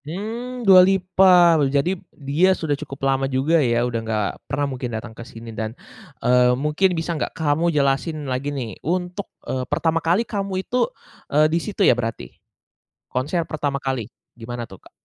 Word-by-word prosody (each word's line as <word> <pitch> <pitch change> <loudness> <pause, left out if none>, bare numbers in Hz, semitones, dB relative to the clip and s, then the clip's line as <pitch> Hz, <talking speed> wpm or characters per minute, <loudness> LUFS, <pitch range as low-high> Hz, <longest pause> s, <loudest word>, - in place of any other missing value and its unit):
Mmm, 230 +9 -5
Dua 190 -2 +9
Lipa, 185 -3 +5
jadi 140 +6 +1 0.2
dia 160 +7 +1
sudah 155 -3 -1
cukup 135 -1 -5
lama 135 0 +1
juga 145 +5 +2
ya 120 -2 +2
udah 120 -2 -2
nggak 110 -2 -1 0.2
pernah 145 +1 0
mungkin 125 -1 -4
datang 110 +1 -8
ke 115 - -11
sini 115 -1 -10
dan, 110 +2 -5 0.5
eee, 125 0 +4
mungkin 155 +6 +1
bisa 165 +1 -2
nggak 160 - -4
kamu 160 +2 +1
jelasin 150 +1 0
lagi 130 +2 -2
nih 125 -8 -5
untuk, 180 +4 -3 0.2
eee, 130 - -2
pertama 165 +2 +1
kali 175 +8 +2
kamu 195 -3 -3
itu, 250 - 0 0.4
eee, 150 +2 +4
di 170 - +3
situ 200 0 0
ya - - +7
berarti? 115 - -4 0.8
Konser 145 +7 -1
pertama 145 -2 -2
kali 130 -4 -2 0.3
gimana 120 0 -6
tuh, 95 - -11
Kak? - - -20
145 Hz, 170 wpm, -22 LUFS, 125-180 Hz, 0.8 s, Dua